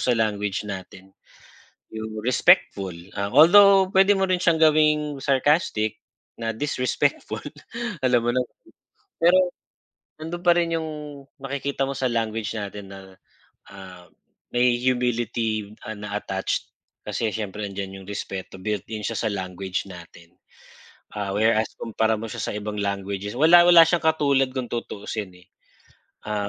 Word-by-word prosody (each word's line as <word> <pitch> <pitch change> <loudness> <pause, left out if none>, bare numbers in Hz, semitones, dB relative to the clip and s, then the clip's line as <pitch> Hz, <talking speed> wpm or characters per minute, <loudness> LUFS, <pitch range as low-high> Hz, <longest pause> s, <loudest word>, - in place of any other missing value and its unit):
sa 125 -2 +1
language 105 -2 -1
natin 95 0 -9 0.8
yung 110 0 -6
respectful. 100 -6 +3 0.2
Although 185 - +6
pwede 195 +2 +6
mo 190 -1 0
rin 185 - +2
siyang 165 -2 +2
gawing 150 -2 +3
sarcastic 135 - +1 0.4
na 115 -1 -3
disrespectful 125 0 -1 0.6
alam 125 -2 +3
mo 120 - +1
na. 130 - +2 0.8
Pero, 175 +2 +5 0.8
nandoon 175 +2 -6
pa 175 -1 +6
rin 165 -1 +1
'yong 160 -1 -4 0.5
makikita 140 0 -3
mo 140 - -4
sa 130 - -1
language 115 -1 -2
natin 100 -1 -7
na 95 - -9 0.7
ah, 95 -2 -12 0.4
may 120 0 +2
humility 120 -4 -1 0.2
na 105 0 -6
attached 95 -2 -3 0.3
kasi 115 - -1
siyempre 105 -1 -5
'andiyan 95 0 -7
'yong 95 - -14
respeto 95 -2 -6
built-in 105 +2 -4
siya - - -3
sa 110 - 0
language 95 -1 -4
natin. 85 -1 -13 0.8
Ah, 100 -2 -3
whereas 110 +1 +2
kumpara 110 0 0
mo 115 - -5
siya - - -6
sa - - -3
ibang 105 0 -5
languages 100 0 -3
wala 175 +4 +7
wala 175 -1 +8
siyang 170 -1 0
katulad 140 -4 +2
kung 130 -3 -4
tutuusin 105 -4 -5
eh. - - -23 0.8
Ah 105 -1 -2
110 Hz, 135 wpm, -24 LUFS, 100-140 Hz, 0.8 s, wala